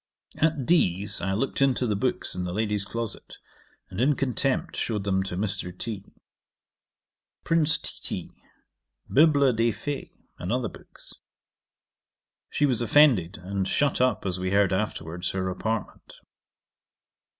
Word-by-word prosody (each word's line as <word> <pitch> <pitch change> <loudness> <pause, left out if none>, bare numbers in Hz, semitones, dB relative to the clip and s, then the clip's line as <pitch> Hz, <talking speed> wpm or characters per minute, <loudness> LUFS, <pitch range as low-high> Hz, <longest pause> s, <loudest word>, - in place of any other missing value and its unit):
'At 155 -4 +1
D 100 - +3
's 105 - -5
I 95 - 0
looked 135 +7 -1
into 130 -2 +3
the 105 -3 0
books 125 +6 -1
in 90 - -3
the 90 0 -3
lady's 105 -1 0
closet, 115 +1 -6 0.5
and, 95 +4 -3
in 140 +3 +4
contempt, 135 0 -1
shewed 105 -4 -1
them 95 -1 +1
to 95 -2 -4
Mr. 95 -3 -3
T. 105 -3 -4 1.4
Prince 160 -2 +3
Titi; - - -6 0.8
Bibl. 140 -4 +5
des 115 +1 +3
Fées, 140 +5 -4 0.3
and - - -3
other - - 0
books. - - -14 1.4
She 145 - +2
was 125 -4 +1
offended, 115 - +4
and 95 0 -2
shut 140 +2 +1
up, 125 -5 +2
as 90 -1 -1
we 95 0 -1
heard 100 -1 +3
afterwards, 90 -3 -2
her 95 -1 -2
apartment. 110 +3 -4
110 Hz, 140 wpm, -26 LUFS, 95-135 Hz, 1.4 s, Bibl